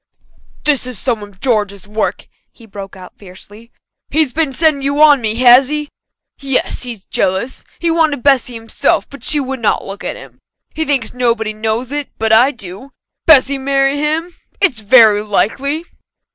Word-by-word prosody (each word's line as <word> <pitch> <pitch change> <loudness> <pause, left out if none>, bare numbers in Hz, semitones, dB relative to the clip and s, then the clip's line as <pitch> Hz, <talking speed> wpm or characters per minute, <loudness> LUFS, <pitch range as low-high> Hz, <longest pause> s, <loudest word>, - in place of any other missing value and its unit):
"This 285 -4 0
is 250 -4 -6
some 230 0 -2
of 205 -2 -13
George's 205 -5 -1
work," 215 +1 -3 0.2
he 230 - -18
broke 195 -3 -10
out 185 -1 -14
fiercely. 205 +4 -14 0.4
"He's 310 -5 +1
been 315 -2 0
setting 300 +1 +1
you 280 +2 -1
on 295 -3 +6
me, 220 -1 0
has 250 +2 +6
he? 300 -1 -3 0.5
Yes, 270 -2 -1
he's 235 -6 -6
jealous 190 +8 -2
he 340 -1 -1
wanted 315 -5 +1
Bessy 260 -3 +2
himself, 225 0 -1
but 280 -4 -13
she 300 - +3
would 270 -1 -4
not 220 - 0
look 195 +1 -8
at - - -4
him. - - -14 0.3
He 315 - -2
thinks 270 -6 -1
nobody 230 -3 -1
knows 220 +4 -3
it, 290 -1 -4
but 220 0 +1
I 240 +5 +6
do. 210 0 -10 0.4
Bessy 280 -3 +5
marry 275 +1 +1
him? 315 +4 -2 0.3
It's 320 - +1
very 215 -1 +5
likely!" 275 +9 -1
250 Hz, 170 wpm, -15 LUFS, 215-285 Hz, 0.5 s, on